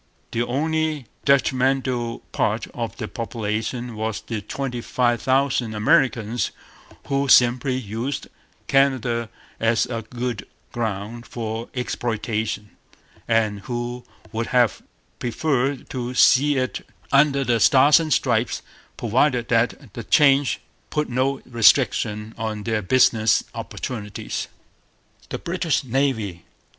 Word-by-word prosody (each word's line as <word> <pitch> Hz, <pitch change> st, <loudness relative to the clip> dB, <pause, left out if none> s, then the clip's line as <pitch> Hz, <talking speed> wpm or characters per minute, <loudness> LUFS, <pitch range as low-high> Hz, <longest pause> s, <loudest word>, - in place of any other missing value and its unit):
The 115 Hz, -, -1 dB
only 155 Hz, +3 st, -1 dB, 0.2 s
detrimental 130 Hz, -3 st, +1 dB
part -, -, 0 dB
of -, -, -4 dB
the -, -, -4 dB
population 115 Hz, +1 st, -3 dB
was 110 Hz, -1 st, -3 dB
the 110 Hz, -3 st, -5 dB
twenty 125 Hz, +3 st, -4 dB
five 120 Hz, -1 st, +1 dB
thousand 130 Hz, -4 st, +1 dB
Americans, 120 Hz, -2 st, +2 dB, 0.6 s
who 140 Hz, 0 st, 0 dB
simply 125 Hz, +1 st, +4 dB
used 120 Hz, +3 st, -4 dB, 0.4 s
Canada 125 Hz, -4 st, +2 dB, 0.3 s
as 115 Hz, 0 st, +2 dB
a 115 Hz, -2 st, -4 dB
good 120 Hz, -1 st, -5 dB, 0.2 s
ground 110 Hz, +1 st, -4 dB
for 115 Hz, 0 st, -5 dB
exploitation, 110 Hz, -3 st, -2 dB, 0.6 s
and 110 Hz, -3 st, +1 dB
who 120 Hz, +3 st, -4 dB, 0.3 s
would 115 Hz, +1 st, -2 dB
have 120 Hz, -5 st, +2 dB, 0.4 s
preferred 135 Hz, +1 st, -1 dB
to 125 Hz, -1 st, -4 dB
see 140 Hz, +3 st, +5 dB
it 130 Hz, -1 st, -2 dB, 0.3 s
under 140 Hz, 0 st, +4 dB
the 120 Hz, -2 st, +1 dB
Stars 140 Hz, +7 st, +6 dB
and 160 Hz, -2 st, -3 dB
Stripes, -, -, +1 dB, 0.3 s
provided 120 Hz, +1 st, +1 dB
that 115 Hz, 0 st, 0 dB
the 115 Hz, -, -6 dB
change 140 Hz, -3 st, +4 dB, 0.3 s
put 150 Hz, -2 st, -1 dB
no 130 Hz, +2 st, 0 dB
restriction 115 Hz, -2 st, +2 dB
on 110 Hz, -2 st, -3 dB
their 110 Hz, -1 st, 0 dB
business 110 Hz, +1 st, +3 dB
opportunities. 105 Hz, -5 st, -5 dB, 0.8 s
The -, -, -3 dB
British 170 Hz, -3 st, -1 dB
Navy. 115 Hz, -9 st, -1 dB
120 Hz, 110 wpm, -23 LUFS, 110-135 Hz, 0.8 s, Stars